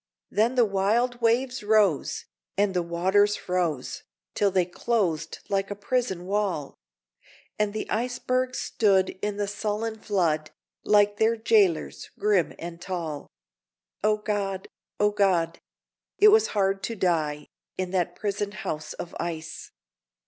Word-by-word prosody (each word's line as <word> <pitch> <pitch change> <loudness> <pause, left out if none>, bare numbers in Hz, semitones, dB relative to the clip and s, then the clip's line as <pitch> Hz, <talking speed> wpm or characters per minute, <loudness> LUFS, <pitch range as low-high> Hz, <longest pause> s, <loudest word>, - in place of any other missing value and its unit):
Then 230 +4 +2
the 245 -2 +5
wild 225 +5 +1
waves 245 +3 +2
rose, 205 -7 +2 0.3
and 200 -1 +2
the 180 - +1
waters 190 +5 +2
froze, 175 -7 -2 0.3
Till 205 - +2
they 185 -2 +2
closed 175 -4 -1
like 195 -1 0
a 205 - -4
prison 205 -4 -1
wall; 190 -7 -1 0.9
And 210 -1 +2
the 215 - -4
icebergs 255 +2 -1
stood 195 -4 +2
in 205 -1 -2
the 205 -1 -1
sullen 215 +2 -3
flood, 165 -8 0 0.3
Like 205 0 +4
their 220 +2 +3
jailers, 210 -7 +2
grim 205 -5 +2
and 170 0 -8
tall. 165 -6 -4 0.7
O 215 0 +3
God! 200 -2 -2 0.3
O 210 0 +4
God! 180 -5 +1 0.6
it 425 - +8
was 435 +1 +5
hard 195 0 +2
to 230 - -4
die 155 -6 0 0.3
In 185 -1 -2
that 180 -2 0
prison 205 0 -2
house 155 -8 -5
of 170 - -7
ice! 160 -2 -5
200 Hz, 135 wpm, -26 LUFS, 175-215 Hz, 0.9 s, it